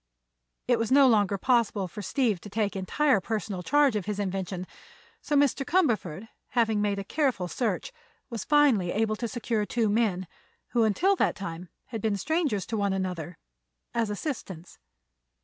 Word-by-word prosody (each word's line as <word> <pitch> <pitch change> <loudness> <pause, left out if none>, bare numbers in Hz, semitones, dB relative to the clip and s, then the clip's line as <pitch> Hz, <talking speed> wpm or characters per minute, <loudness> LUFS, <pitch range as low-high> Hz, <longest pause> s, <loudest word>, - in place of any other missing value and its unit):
It 245 -2 +3
was 230 +1 -1
no 275 0 +7
longer 205 -4 +3
possible 225 -3 +1
for 210 +4 -8
Steve 215 -2 0
to 205 - -9
take 210 0 -1
entire 220 +5 +2
personal 210 -3 -3
charge 285 - +3
of 205 -1 -2
his 210 -1 -2
invention, 190 -2 -3 0.6
so 295 - -1
Mr. 280 -1 +3
Cumberford, 225 - 0 0.2
having 225 -4 +1
made 205 -1 0
a 200 - -3
careful 255 - 0
search, 220 - -2 0.3
was 230 -5 -5
finally 265 -12 +3
able 215 +1 0
to 235 - -2
secure 230 -1 -1
two 225 +1 0
men, 205 -4 +1 0.4
who 235 -2 +2
until 365 - +3
that - - +2
time 180 -3 -7 0.2
had 225 -3 -5
been 210 -2 0
strangers 285 - 0
to 225 - -3
one 200 -1 +1
another, 180 -3 -4 0.6
as 230 -2 0
assistants. 205 - -6
215 Hz, 165 wpm, -27 LUFS, 195-245 Hz, 0.6 s, no